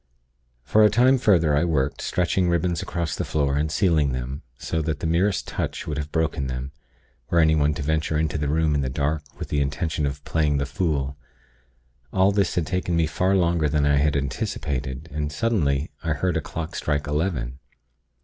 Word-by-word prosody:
"For 90 +11 +4
a 105 - +7
time 125 +5 +4
further, 85 - +4
I 75 - +3
worked, 70 -5 0
stretching 90 0 +1
ribbons 85 0 0
across 80 -3 -3
the - - -2
floor, 70 -3 0
and 75 +1 0
sealing 80 -7 +2
them, 65 +3 -4 0.2
so 80 - -2
that 80 -2 -2
the - - -4
merest 90 +5 +1
touch - - -3
would 75 -2 -3
have 75 0 -5
broken 80 -4 0
them, 65 +1 -4 0.6
were 85 - +1
anyone 80 -2 +4
to 75 - -4
venture 80 +1 0
into 75 -1 0
the 75 - -1
room 80 +1 +2
in 70 - +1
the 65 - -1
dark 70 +3 -1 0.2
with - - -6
the 75 - +1
intention 75 +2 -1
of 70 +1 -5
playing 75 -2 +1
the 70 - 0
fool. 70 -3 -1 0.9
All 95 +1 +4
this 100 -2 +1
had 85 - +1
taken 90 -1 -1
me 85 -1 +3
far 90 +5 +1
longer 85 -4 +2
than 75 0 +1
I 70 0 +3
had 75 +1 +2
anticipated; 70 0 -3
and, 75 0 -3
suddenly, 75 -4 0
I 80 -2 0
heard 90 +3 -1
a 80 - +1
clock 80 +3 -6
strike 75 -1 -1
eleven. 75 -5 -2
75 Hz, 195 wpm, -24 LUFS, 70-85 Hz, 0.9 s, a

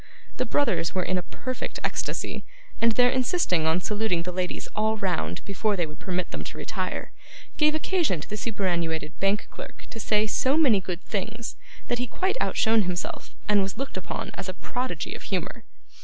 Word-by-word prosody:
The 255 - 0
brothers 230 - +2
were 185 - +2
in 185 0 +1
a - - -2
perfect 255 +7 -4
ecstasy; - - -1 0.4
and 230 0 +5
their 245 +1 +5
insisting 250 - +2
on 160 +2 +4
saluting 205 -4 +1
the 180 - -2
ladies 180 0 -2
all 220 +1 +2
round, 190 -5 -1
before 205 +2 +1
they 175 -3 +1
would 150 -1 -10
permit 180 -1 -1
them - - -3
to - - -6
retire, - - -3 0.5
gave 305 0 +5
occasion 310 - +2
to - - -7
the 210 - -3
superannuated 170 -8 -1
bank 195 +2 +2
clerk - - -9
to 225 - -6
say 215 0 +3
so 265 +6 +3
many 250 -11 +6
good 180 -1 -4
things, 220 +3 -3 0.3
that 240 - 0
he 250 - 0
quite 380 - 0
outshone 225 -1 +4
himself, 180 -2 -3
and 210 -1 +5
was 195 0 -2
looked 275 +1 -3
upon 185 - -3
as 195 -1 -4
a 185 - -4
prodigy 250 +5 -3
of - - -7
humour. - - -2
210 Hz, 185 wpm, -27 LUFS, 180-245 Hz, 0.5 s, many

